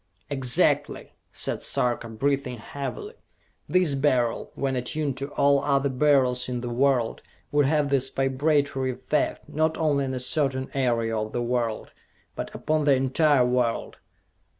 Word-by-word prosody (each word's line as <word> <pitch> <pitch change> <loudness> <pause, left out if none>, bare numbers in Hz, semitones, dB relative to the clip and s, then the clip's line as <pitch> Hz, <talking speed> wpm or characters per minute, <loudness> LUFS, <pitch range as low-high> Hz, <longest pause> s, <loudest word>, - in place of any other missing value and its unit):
"Exactly!" 130 -3 +2 0.2
said - - -2
Sarka, 120 -1 -1
breathing 135 +2 -1
heavily. 140 - -6 0.6
"This 180 -5 +3
Beryl, 130 -4 0
when 135 -1 -1
attuned 135 +3 -2
to 140 +1 -4
all 140 0 +3
other 140 -1 +1
Beryls 130 -2 +2
in 125 -1 -3
the 120 -1 -4
world, 125 -2 +1 0.3
would 145 -2 +3
have 150 -1 +1
this 135 -1 +1
vibratory 135 0 0
effect, - - -2
not 160 +1 0
only 145 -3 +1
on 130 0 -3
a - - -3
certain 130 0 0
area 115 -4 0
of 110 0 -3
the 120 - -1
world 120 -2 -2 0.4
but - - -5
upon 155 -1 0
the 140 -2 +5
entire 135 +1 +3
world! 125 -2 -1
135 Hz, 145 wpm, -25 LUFS, 125-145 Hz, 0.6 s, the